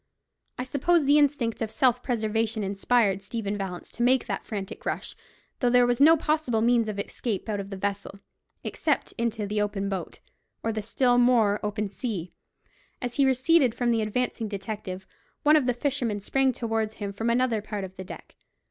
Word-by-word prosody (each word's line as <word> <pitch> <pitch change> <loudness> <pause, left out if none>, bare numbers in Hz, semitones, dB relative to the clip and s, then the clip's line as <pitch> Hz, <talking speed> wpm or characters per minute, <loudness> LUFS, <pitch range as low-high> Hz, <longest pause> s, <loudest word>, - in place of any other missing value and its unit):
I 250 - -2
suppose 290 +5 +2
the 290 +2 +5
instinct 270 -6 +1
of 225 - -1
self 250 +1 +2
preservation 225 -2 -1
inspired 200 0 +1
Stephen 210 0 -3
Vallance 190 -3 -5
to - - -7
make 250 +1 +3
that - - -4
frantic 200 -2 -5
rush, - - -3 0.4
though 245 - +2
there 245 0 +5
was 245 +1 +1
no 325 +3 +8
possible 305 -7 0
means 235 -1 +3
of 210 -2 -4
escape 205 +1 -3
out 210 -2 -2
of 195 0 -6
the 195 - -6
vessel, 200 0 -4 0.4
except - - -1
into 230 -2 -1
the 210 +1 -1
open 200 -1 -1
boat, 190 -2 -5 0.4
or 225 - 0
the 215 - -2
still 245 +3 +2
more 230 -4 +4
open 210 0 -2
sea. 195 -4 -5 0.7
As 245 0 -4
he 275 -1 +4
receded 260 -1 +3
from 240 -1 +1
the 225 -1 +2
advancing 225 +1 -1
detective, 195 -2 -5 0.4
one 300 +1 +6
of 290 -5 +3
the 250 - +3
fishermen 245 -5 -1
sprang 265 +6 +1
towards 225 -2 -2
him 200 -1 -5
from 225 +3 -1
another 235 -2 +2
part 210 -1 -5
of 190 0 -8
the 190 - -7
deck. 185 - -11
225 Hz, 185 wpm, -26 LUFS, 205-250 Hz, 0.7 s, no